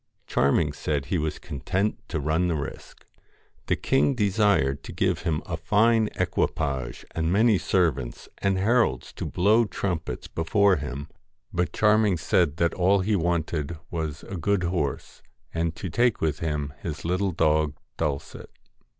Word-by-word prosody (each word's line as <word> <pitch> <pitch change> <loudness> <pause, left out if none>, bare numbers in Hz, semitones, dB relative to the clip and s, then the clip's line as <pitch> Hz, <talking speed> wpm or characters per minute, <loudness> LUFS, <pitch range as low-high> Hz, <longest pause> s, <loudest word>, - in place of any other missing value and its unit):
Charming 70 +1 +2
said 70 -1 -2
he 85 +5 -1
was 75 -1 -2
content 95 - -2
to 80 - -2
run 80 +5 +1
the 85 - 0
risk. 70 -2 -7 0.6
The - - +2
king 135 +1 +2
desired 100 - +2
to - - -9
give - - 0
him 80 -2 -1
a 85 - -3
fine 110 +5 +3
equipage 70 -7 -1
and 80 0 -1
many 105 0 +4
servants 70 -10 0
and 100 -1 +1
heralds 100 - +1
to - - -5
blow 110 +6 +3
trumpets 90 -5 -3
before 95 +4 +2
him; 70 0 -5 0.5
but 90 0 0
Charming 105 -3 +3
said 80 -1 +1
that 85 0 +2
all 95 +2 +3
he 105 +3 +1
wanted 85 -3 -1
was 80 -4 -4
a 95 - -6
good 100 +2 +1
horse, 85 -5 -2 0.3
and 80 -1 -1
to 95 - -5
take 120 +6 +2
with 80 -2 -1
him 75 -3 -2
his 75 -3 -5
little 90 +3 +1
dog 75 -2 +2 0.2
Dulcet. 75 -4 -3
85 Hz, 150 wpm, -26 LUFS, 75-100 Hz, 0.6 s, many